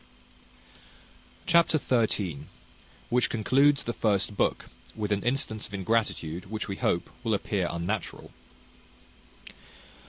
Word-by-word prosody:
Chapter 170 -1 +4
xiii. 105 - 0 0.7
Which 125 +1 +3
concludes 140 +6 +3
the 120 - -3
first 105 -2 +1
book; - - 0 0.3
with 105 -1 -3
an 100 -1 +1
instance 120 -4 0
of 100 - -7
ingratitude, 95 -4 -1
which, 110 0 -4
we 95 -1 -4
hope, 85 - 0
will 110 -3 +1
appear 100 -2 -1
unnatural. 90 +4 -4
105 Hz, 105 wpm, -28 LUFS, 95-120 Hz, 0.7 s, Chapter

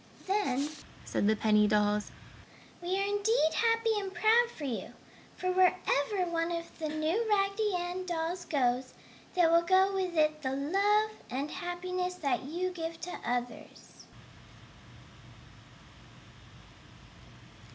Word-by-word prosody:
"Then," 335 -9 0 0.4
said 205 - 0
the 220 - +4
penny 210 -1 +3
dolls, 210 0 +1 0.7
"we 360 +2 -1
are 395 - +1
indeed 410 -4 +2
happy 455 -1 +2
and 390 -1 -5
proud 450 +4 +4
for 315 - -10
you! 255 -5 -4 0.4
For 365 0 -1
wherever 365 -1 +2
one 330 0 0
of 335 0 -5
the 310 -1 -2
new 320 +9 -1
Raggedy 400 0 +1
Ann 355 +1 -3
dolls 345 +1 -2
goes 255 -3 0 0.4
there 345 -2 +4
will 335 0 +6
go 375 +3 +3
with 370 -3 -2
it 305 0 +2
the 260 -2 -2
love 400 +9 +2 0.2
and 275 +4 -3
happiness 360 0 -3
that 290 -6 -1
you 355 +6 -2
give 330 -2 -5
to 360 - -5
others." 245 -1 -5
350 Hz, 125 wpm, -30 LUFS, 295-390 Hz, 0.7 s, will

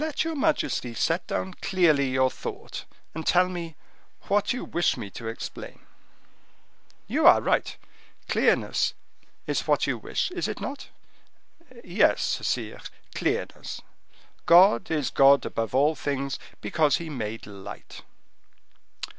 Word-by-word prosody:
"Let 310 -1 -1
your 325 0 -2
majesty 275 - 0
set 165 +7 0
down 190 - -3
clearly 155 -8 +3
your 130 0 +2
thought, - - -7 0.3
and 160 - -5
tell 180 +2 +4
me 170 -3 -6 0.5
what 205 0 +1
you 250 - -3
wish 175 - 0
me 100 - -7
to 115 - -7
explain." 115 - -7 1.2
"You 290 +9 +3
are - - +8
right, - - 0 0.5
clearness - - +1 0.5
is - - -2
what - - +3
you - - -2
wish, 385 -1 -2
is 355 -1 -2
it - - -5
not?" 275 +1 -6 1.0
"Yes, 180 +4 +2
sire, - - -3 0.3
clearness. - - -3 0.6
God 170 -7 +6
is 150 -4 -1
God 140 +1 +5
above 115 +2 -3
all 145 +4 +4
things, 140 -3 -3 0.2
because 155 -3 +2
He 170 - -6
made 115 -4 -5
light." 100 -1 -10
160 Hz, 130 wpm, -26 LUFS, 130-190 Hz, 1.2 s, are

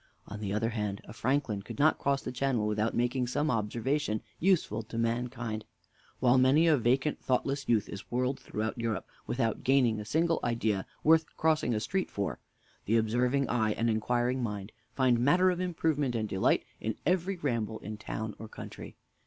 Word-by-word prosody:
On 100 - -7
the 100 -2 -3
other 110 +2 0
hand, 105 -3 -3
a - - -11
Franklin 125 -3 0
could - - -9
not 150 +2 +4
cross 140 0 0
the - - -4
channel 125 -3 0
without 105 +1 0
making 125 +1 +1
some 145 +5 0
observations 115 +2 -1 0.2
useful 165 - +2
to 110 +1 -8
mankind. 115 -1 -2 0.6
While 125 +1 +5
many 135 +6 +5
a 160 -2 +6
vacant, 130 +4 +1
thoughtless 135 +2 0
youth 110 -3 +3
is 100 +1 -8
whirled 125 +2 0
throughout 110 +2 -4
Europe 115 -4 -2 0.2
without 115 -3 -1
gaining 125 -5 +3
a - - -4
single 165 +8 +1
idea 110 -5 0 0.2
worth 160 0 +5
crossing 155 -7 +2
a - - +1
street 145 - -1
for, 100 -1 -3 0.5
the 115 +3 +3
observing 125 +5 +1
eye 110 -3 +1
and 115 +1 +1
inquiring 120 +3 0
mind 105 -3 -4 0.2
find 125 -3 +3
matter 180 +9 +4
of 180 - -3
improvement 160 -7 0
and 110 -1 -1
delight 95 -2 +2
in - - -2
every 185 +2 +1
ramble 115 -8 -1
in 105 +1 -7
town 110 0 -4
or 110 - -7
country. - - -9
120 Hz, 180 wpm, -30 LUFS, 110-140 Hz, 0.6 s, a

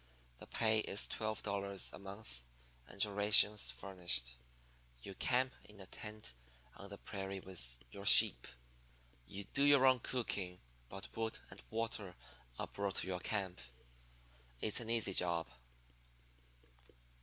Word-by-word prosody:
The - - -12
pay 110 -1 +1
is 105 -1 0
twelve 110 -1 -5
dollars 100 -1 -3
a - - -10
month 100 - -11 0.5
and 100 +1 0
your 105 -1 -3
rations 105 +1 +4
furnished. 85 -11 -3 0.7
You 95 - -9
camp 130 +6 -1
in 105 -1 -16
a 95 - -10
tent 105 - -10 0.4
on - - -12
the - - -10
prairie 95 -1 -7
with 85 -11 -4
your 100 0 -9
sheep. - - +10 0.8
You 100 +1 -8
do 140 - 0
your 140 -2 +4
own 130 -1 +4
cooking, 100 -8 -4 0.3
but 95 +1 -11
wood 110 0 -4
and - - -13
water 110 -4 -5 0.4
are - - -4
brought 100 -2 -5
to - - +2
your 90 -1 -4
camp. 95 - -4 1.0
It's 105 - -2
an 115 -2 -7
easy 115 -4 0
job.' 85 -2 -1
100 Hz, 140 wpm, -35 LUFS, 95-110 Hz, 1.0 s, sheep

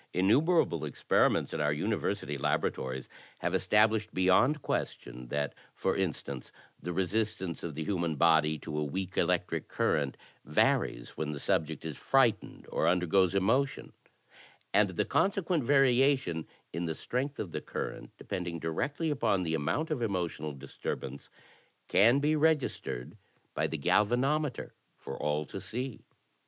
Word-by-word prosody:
Innumerable 110 - +3
experiments 75 -4 +1
in - - -2
• - - +1
our 75 - +2
university 75 0 -1
laboratories 65 -1 -1 0.3
have - - -2
established 110 0 +3
beyond 120 +11 +3
question 60 0 -3
that, 70 +2 -2 0.2
for 95 - 0
instance, 95 -5 -3 0.3
the 90 - -4
resistance 95 0 -1
of 80 -4 -5
the 80 - -3
himian 85 -6 -1
body 80 -1 +4
to 75 -1 -4
a - - 0
weak 95 +6 -4
electric - - 0
current 70 -2 0 0.3
varies - - +1
when 75 -1 -3
the 70 - -5
subject 80 +1 -1
is 80 - -5
frightened 120 -6 +1
or - - +1
undergoes 90 +1 +3
emotion; 125 +8 +1 0.8
and 100 0 +4
the 90 - -1
consequent 185 -5 +1
variation 130 - +3 0.3
in 85 - -2
the 80 -1 -2
strength 135 - -3
of 90 - -4
the - - -4
current - - -5
depending 85 -2 -4
directly 140 - -2
upon 110 -9 +1
the 80 -2 -1
amoimt 80 - -1
of 145 -5 -1
emotional 90 -8 -2
disturbance, 70 0 -6 0.6
can 115 +6 +5
be 150 +2 +2
registered 150 - 0 0.4
by - - 0
the - - -3
galvanometer 130 +6 +1 0.3
for 70 - -7
all 75 +1 -1
to - - -7
see. 125 +1 -5
95 Hz, 140 wpm, -30 LUFS, 80-125 Hz, 0.8 s, can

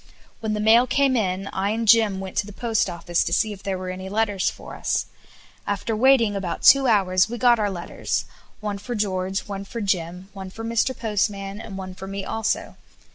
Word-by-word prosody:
When 215 -1 -2
the - - -2
mail 225 +4 +5
came 270 +1 +2
in, 195 -3 -1
I 195 +1 0
and 225 +1 -1
Jim 215 -3 +5
went 190 -1 -7
to 200 - +1
the - - -8
Post 225 0 0
Office 170 0 0
to - - -3
see 215 +4 +2
if 195 - -12
there 195 -1 -2
were 185 0 -5
any 185 +1 -6
letters 205 -2 +1
for - - -10
us. - - -1 0.6
After 205 +2 -1
waiting 235 -3 +4
about 185 -3 -3
two 275 -1 +7
hours 190 -3 +3
we 240 - -4
got 240 -1 +4
our 205 -1 +1
letters; 175 -3 -3 0.4
one 205 -1 -3
for 240 +4 -5
George, 190 -2 -1
one 195 0 -6
for 230 +4 -7
Jim, 185 -2 -2
one 190 -2 -7
for 225 +4 -8
Mr. 230 +3 0
Postman, 205 -2 -2
and 195 -4 -8
one 185 -1 -6
for 190 +1 -9
me 195 0 -5
also. 225 -1 -2
205 Hz, 210 wpm, -23 LUFS, 190-225 Hz, 0.6 s, two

